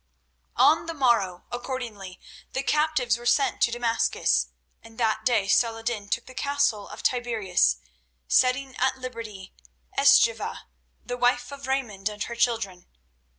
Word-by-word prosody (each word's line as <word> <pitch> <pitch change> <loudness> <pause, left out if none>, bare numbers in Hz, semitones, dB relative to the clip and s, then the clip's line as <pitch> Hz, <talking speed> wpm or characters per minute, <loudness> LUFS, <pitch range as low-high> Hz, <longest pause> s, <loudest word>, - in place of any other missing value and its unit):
On 285 +6 +4
the 330 - -4
morrow, 230 - +1
accordingly, 240 -7 -6 0.3
the 265 - -1
captives 300 -6 +1
were 240 - -11
sent 275 -1 +2
to 235 - +4
Damascus, 230 - +1 0.3
and 225 0 -16
that 220 -2 0
day 220 -5 +2
Saladin 225 0 0
took 235 - -1
the 255 - -12
castle 280 -8 0
of - - -10
Tiberias, 215 - +1 0.5
setting 260 +1 +2
at - - +1
liberty 225 -7 -8 0.4
Eschiva, - - +4 0.4
the 245 - -4
wife 245 +1 +1
of 280 -1 -8
Raymond, 220 -7 -1
and 210 0 -5
her 235 - -6
children. 225 -7 -1
235 Hz, 135 wpm, -26 LUFS, 210-255 Hz, 0.5 s, On